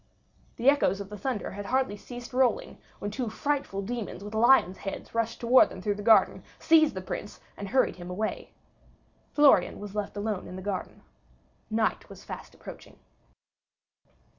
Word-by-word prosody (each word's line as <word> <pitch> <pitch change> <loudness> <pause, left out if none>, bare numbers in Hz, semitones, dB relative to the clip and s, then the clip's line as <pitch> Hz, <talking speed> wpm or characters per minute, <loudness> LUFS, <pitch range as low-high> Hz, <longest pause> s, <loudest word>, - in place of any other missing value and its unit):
The 240 - -2
echoes 275 -9 +4
of 200 -1 -7
the 210 - -7
thunder 245 -3 -3
had 200 +1 -7
hardly 260 -2 +1
ceased 245 +4 -10
rolling 265 - +1 0.2
when 205 - -5
two 240 +1 -3
frightful 270 -5 -2
demons 220 -2 -5
with 205 +1 -8
lions' 220 -5 +4
heads 195 - -7
rushed 230 0 -1
towards 245 +2 +5
them - - -9
through 205 +3 -1
the 205 - -7
garden, 220 +1 +4 0.2
seized 315 -5 +4
the 190 - -4
Prince, 185 - -6 0.2
and 200 - -6
hurried 260 -3 +2
him 175 0 -8
away. 210 +4 -3 0.8
Florian 280 -11 +4
was 205 -1 -8
left 210 0 -4
alone 205 -2 -3
in 185 - -8
the 185 - -7
garden. 195 -2 -5 0.7
Night 220 0 0
was - - -12
fast - - -9
approaching. - - -12
215 Hz, 165 wpm, -28 LUFS, 200-250 Hz, 0.8 s, towards